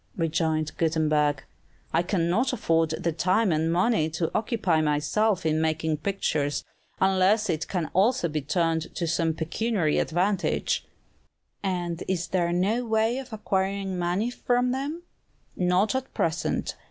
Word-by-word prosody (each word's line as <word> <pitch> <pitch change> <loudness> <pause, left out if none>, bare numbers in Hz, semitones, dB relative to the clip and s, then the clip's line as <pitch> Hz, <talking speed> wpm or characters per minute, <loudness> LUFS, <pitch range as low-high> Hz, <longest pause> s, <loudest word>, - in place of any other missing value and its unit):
rejoined 160 -2 0
Gutenberg. 155 -3 +1 0.5
"I - - +4
cannot 180 +7 +1
afford 165 -4 +1
the 165 +2 -1
time 185 +5 +2
and 160 +1 +1
money 180 -2 +2
to 160 +1 -2
occupy 210 -7 +1
myself 160 +7 +1
in 155 0 +2
making 160 0 0
pictures, 150 -5 -1 0.4
unless 195 +3 +3
it 160 -1 -2
can 180 -4 -1
also 200 +1 +3
be 155 -1 -2
turned 165 +2 -1
to 170 - -1
some 165 0 0
pecuniary 165 +1 0
advantage." 185 +3 0 0.7
"And 175 -3 -2
is 180 -2 -1
there 175 -2 +1
no 200 +8 +1
way 225 +2 +1
of 265 -2 -9
acquiring 195 -2 -1
money 180 +7 0
from 245 0 +1
them?" 285 +6 -3 0.5
"Not 180 +5 +2
at 260 0 -3
present. 165 0 -1
175 Hz, 135 wpm, -26 LUFS, 160-210 Hz, 0.7 s, I